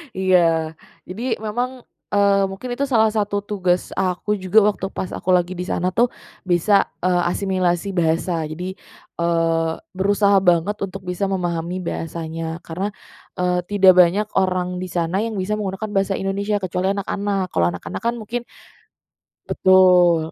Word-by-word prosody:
Iya, 170 -4 +2 0.4
jadi 225 +5 -2
memang, 245 +4 -3 0.3
eee, 200 -1 +4
mungkin 195 +6 -7
itu 280 +3 0
salah 220 -4 +3
satu 205 -1 -1
tugas 185 -3 -1
aku 190 +2 0
juga 190 +3 +4
waktu 205 -2 0
pas 185 - -4
aku - - -5
lagi 175 0 +1
di 180 - -3
sana 180 0 -1
tuh, 235 +6 +3 0.4
bisa, 190 +3 +3 0.2
eee, 180 -1 +2
asimilasi 185 -1 0
bahasa, 165 -1 0
Jadi, 180 +5 -6 0.4
eee, 165 -1 +1 0.2
berusaha 200 +1 +3
banget 180 +2 +2
untuk 195 +1 -9
bisa 180 +2 -2
memahami 175 -1 -2
bahasanya. 165 0 -5
Karena, 185 +5 -3 0.5
eee, 180 0 0
tidak 195 -2 +6
banyak 185 +4 +4
orang 185 -1 0
di 185 - -4
sana 175 +1 -1
yang 220 0 -2
bisa 200 +3 -1
menggunakan 200 +1 -4
bahasa 195 -1 +1
Indonesia 200 +2 -1
kecuali 185 +1 -1
anak-anak. 200 -1 -2
Kalau 85 - +2
anak-anak 90 - -6
kan 235 +1 0
mungkin 235 +1 -4 1.1
betul. 180 -3 +4
185 Hz, 145 wpm, -21 LUFS, 175-205 Hz, 1.1 s, tidak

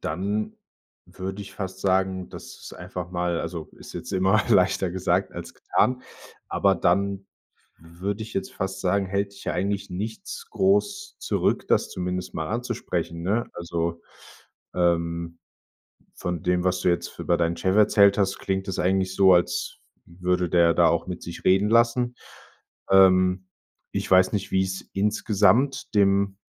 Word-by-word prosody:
dann 100 +7 -2 0.5
würde 95 +2 -7
ich 100 - -11
fast 95 -1 -6
sagen, 95 -1 0
dass - - -9 0.2
es - - -9
einfach 90 -1 -7
mal 90 -1 -1
also, 85 -1 -5
ist - - -11
jetzt - - -6
immer 95 +3 +3
leichter 95 -3 +3
gesagt 90 +1 0
als - - -8
getan. 125 0 0 0.5
Aber 100 -1 +2
dann 100 +2 0 0.5
würde 90 +6 -5
ich 110 - -9
jetzt 195 0 -3
fast 95 -1 -4
sagen, 95 +1 +1
hält 100 +1 -2
dich 100 - -13
ja - - -1
eigentlich 100 +2 -2
nichts 115 - -6
groß 205 - 0
zurück, - - -1
das - - +2
zumindest 90 0 -4
mal 80 -1 -3
anzusprechen, 100 -7 -3
ne? 105 +7 0
Also, 85 -1 -3 0.7
ähm, 85 -1 0 0.8
von 90 -3 -4
dem, 90 0 +1
was 90 0 +1
du - - +2
jetzt 85 - -1
f - - -20
über 85 - +1
deinen 85 0 0
Chef 95 0 0
erzählt 100 -1 +5
hast, 95 -1 +1
klingt 95 0 -3
das 95 - -3
eigentlich 95 +1 +1
so, 95 -1 +6
als 85 0 0 0.3
f 85 - -19
würde 90 0 +1
der 85 -1 +4
da - - +5
auch - - 0
mit 90 -1 -6
sich 85 - -8
reden 95 +3 +3
lassen. 120 +1 +3 0.8
Ähm, 95 -1 +5 0.5
ich - - -3
weiß 95 0 +5
nicht, 100 -3 -2
wie's 95 0 -1
insgesamt 105 +6 +2
dem 100 -1 +3
95 Hz, 160 wpm, -25 LUFS, 90-100 Hz, 0.8 s, so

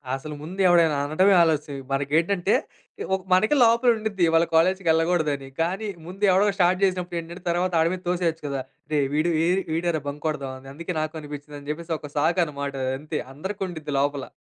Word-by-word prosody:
అసలు 150 +3 -7
ముందు 180 +5 -8
ఎవడైనా 165 -4 +4
అనడమే 185 +7 +3
ఆలస్యం 150 -4 0
మనకేంటంటే 165 +8 +1 0.6
ఒక - - -3
మనకే 215 +10 +4
లోపల 235 +2 +4
ఉండిద్ది 210 -4 -2
ఇవాళ 165 +1 +4
కాలేజికెళ్ళగూడదని. 165 -5 +2
కానీ 190 +6 -1 0.2
ముందు 190 +4 -8
ఎవడో 195 +3 +4
స్టార్ట్ 185 +1 +3
జేసినప్పుడేంటంటే 175 -2 -2
తర్వాత 180 +2 +1
ఆడి 165 +2 +3
మీద 185 - -5
తోసేయొచ్చు 170 -3 -1
కదా! 135 -1 -2 0.3
రేయ్ 140 -2 +2
వీడు 160 +3 +2
ఏడి 185 +2 +2
వీడేరా 165 -1 0
బంకొడదామని, 140 -3 -4
అందుకే 170 +4 -5
నాకు 155 0 -3
అనిపించిందని 145 0 -9
జెప్పేసి 165 +1 -4
ఒక 150 - -9
సాకనమాట 150 -3 0
అదంతే. 150 +4 -3
అందరికుండిద్ది 175 -2 -5
లోపల. 140 -1 -1
165 Hz, 150 wpm, -24 LUFS, 150-180 Hz, 0.6 s, ఎవడైనా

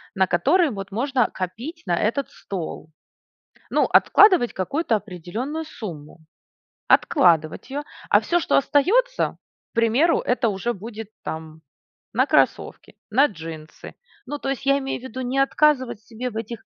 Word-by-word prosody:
на 190 -1 +3
который 320 - +3
вот 195 -4 -7
можно 250 +3 +1
копить 235 - -6
на 175 - +1
этот 235 +9 0
стол? 170 -4 -7 0.8
Ну, - - +3
откладывать 370 - +5
какую-то 230 - 0
определенную 215 - -5
сумму, 170 - -9 0.7
откладывать 165 - +3
ее, 285 +2 -3 0.3
а - - +6
всё, 350 - +1
что - - +1
остается, 450 - +2 0.3
к - - -67
примеру- 230 +9 +3
это 250 -1 +1
уже 210 +4 -2
будет 220 +1 -8
там 160 0 -7 0.5
на - - +2
кроссовки, - - 0
на 265 +7 +5
джинсы. 160 - -10 0.3
Ну, 290 +3 -4
то 275 - -5
есть 270 -1 -4
я 275 0 +4
имею 270 -2 -4
в 255 - -14
виду 260 0 -6
не 255 +2 -2
отказывать 270 -5 +2
себе 240 +3 -6
в 220 - -11
этих 225 0 -5
240 Hz, 145 wpm, -23 LUFS, 190-280 Hz, 0.8 s, а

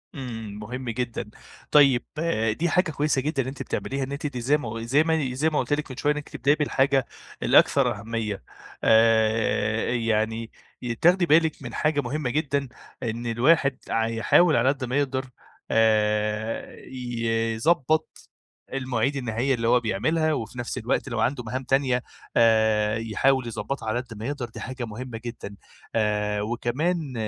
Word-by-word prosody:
إمم 115 -6 -6
مهم 125 +3 -6
جدًا، 120 -2 -3 0.4
طيب 135 -5 +6 0.6
دي 175 - +1
حاجة 180 0 +2
كويسة 145 -2 0
جدًا 150 -1 -1
إن - - -7
أنتِ 130 0 -6
بتعمليها، 135 0 -3
إن 135 - -5
أنتِ 140 +2 -5
دي 125 -3 -5
زي 140 +5 +3
ما 115 -5 -5
زي 140 +7 +3
مي 155 -6 0
زي 155 +5 +2
ما 150 - 0
قُلت 130 +2 -1
لِك 145 -2 -2
من 130 - -8
شوية 150 - +2
إنِك 150 0 -7
تبدئي 145 +3 +2
بالحاجة 135 -3 +2 0.4
الأكثر - - +4
أهمية، 110 - -4 0.4
آآ 110 -1 +3
يعني 115 -1 -1 0.5
تاخدي 175 +1 +5
بالِك 160 -1 +3
من 120 -3 -7
حاجة 150 -2 +1
مهمة 135 +1 -2
جدًا 140 0 -1 0.4
إن 115 0 -3
الواحد 135 +4 +3
ع 115 0 +1
يحاول 145 +8 +4
على 120 +3 +3
قد 135 -2 -1
ما 125 +3 -1
يقدر 135 -2 0 0.5
آآ 105 0 +1
يضبّط 120 +5 -1 0.4
المواعيد 130 0 -1
النهائية 125 +1 0
اللي 115 -1 -2
هو 125 +1 +5
بيعملها، 155 +9 0
وفي 120 -1 -5
نفس 120 +2 -4
الوقت 120 +2 -1
لو 115 -2 -3
عنده 125 +2 0
مهام 130 +4 -4
تانية 130 -2 +1 0.3
آآ 110 -2 +3
يحاول 120 +3 +1
يضبّطها 115 +1 -4
على 120 - 0
قد 125 -3 -11
ما 110 - -6
يقدر، 135 -4 -4
دي - - -10
حاجة 130 -1 -5
مهمة 115 +2 -7
جدًا، 115 -4 -7 0.4
آآ 105 -1 0
وكمان 130 +7 -1
125 Hz, 160 wpm, -25 LUFS, 115-140 Hz, 0.6 s, طيب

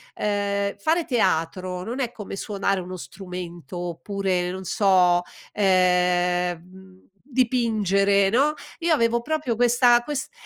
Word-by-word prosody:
ehm, 200 -1 -1
fare 320 +10 +1
teatro 180 - -1
non 240 +7 -5
è 245 -3 -1
come 210 -4 -8
suonare 195 -1 -1
uno 185 0 -7
strumento 175 0 -8
oppure, 180 +1 -2
non 190 +1 -6
so, 180 -2 +3 0.3
ehm, 180 -2 +2
mhmm, 185 +1 -18
dipingere, 215 -7 +2
no, 275 +8 +2 0.3
io 335 -1 +2
avevo 235 -4 +2
proprio 300 -6 -1
questa 240 0 +4
quest 295 - -4
195 Hz, 120 wpm, -24 LUFS, 180-235 Hz, 0.3 s, questa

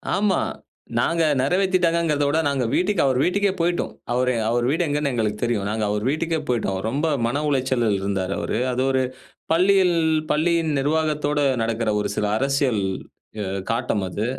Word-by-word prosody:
ஆமா 200 0 +2 0.6
நாங்க 165 -1 +1 0.2
நிறைவேத்திட்டாங்கங்கிறத 170 -2 +1
விட 150 +3 +1
நாங்க 135 -3 0
வீட்டுக்கு 185 0 +1
அவர் 130 -2 +2
வீட்டுக்கே 200 +1 +2
போயிட்டோம். 175 +1 0 0.2
அவரு 125 0 +1
அவர் 120 +1 +1
வீடு 165 +4 +1
எங்கன்னு 145 -1 0
எங்களுக்கு 105 -2 -1
தெரியும். 110 -4 0
நாங்க 110 0 -2
அவர் 105 0 -1
வீட்டுக்கே 160 +2 -1
போயிட்டோம். 110 -6 -1
ரொம்ப 145 +7 -1 0.2
மன 140 +5 -1
உளைச்சலில் 130 -6 +1
இருந்தார் 95 -1 -2
அவரு. - - -2
அது 125 +1 -1
ஒரு 130 0 +2 0.5
பள்ளியில் 185 +1 +4 0.4
பள்ளியின் 160 +1 +1
நிர்வாத்தோடு 150 0 0 0.2
நடக்கிற 115 -1 -1
ஒரு - - -2
சில 105 - 0
அரசியல் 135 -5 +1 0.9
காட்டம் 115 -4 -1
அது. 105 +5 -3
140 Hz, 145 wpm, -22 LUFS, 115-165 Hz, 0.9 s, பள்ளியில்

